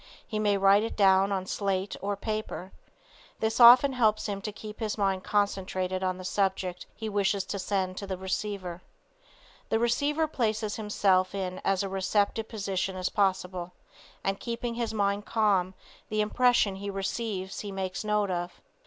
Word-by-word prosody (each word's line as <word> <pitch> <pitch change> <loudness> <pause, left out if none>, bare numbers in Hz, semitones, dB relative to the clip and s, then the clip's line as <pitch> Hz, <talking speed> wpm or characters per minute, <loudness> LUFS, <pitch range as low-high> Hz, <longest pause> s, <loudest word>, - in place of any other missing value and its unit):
He 215 - -3
may 205 -1 +2
write 195 +1 +5
it 225 - -3
down 195 -1 +5
on 190 -1 -1
slate 195 0 -2
or 200 +1 -1
paper. 215 -3 -4 0.7
This 220 +2 0
often 250 +3 +9
helps 220 -4 +2
him 200 -2 -3
to 210 - -4
keep 210 +1 -9
his 220 -2 -2
mind 195 -2 0
concentrated 190 -2 -1
on 185 -1 0
the 185 - -8
subject 190 -2 -1
he 220 - -5
wishes 200 -1 +1
to 200 +1 -5
send 185 -1 -1
to 200 - -5
the 190 -1 -3
receiver. 190 -1 -4 0.9
The - - +2
receiver 285 +7 +1
places 220 -7 -1
himself 195 -3 +2
in 185 -2 -3
as 195 0 +1
receptive 200 +3 0
a - - -32
position 195 -3 -2
as 185 0 -1
possible, 185 -3 -1 0.5
and 195 0 -1
Keeping 235 0 -3
his 230 -1 -2
mind 205 -1 0
calm, 195 -5 +2 0.3
the 215 0 +1
impression 215 -2 +3
he 200 +1 -5
receives 195 0 -3
he 205 - -5
makes 190 0 -3
note 210 -2 +1
of. 175 0 -4
200 Hz, 165 wpm, -28 LUFS, 190-215 Hz, 0.9 s, often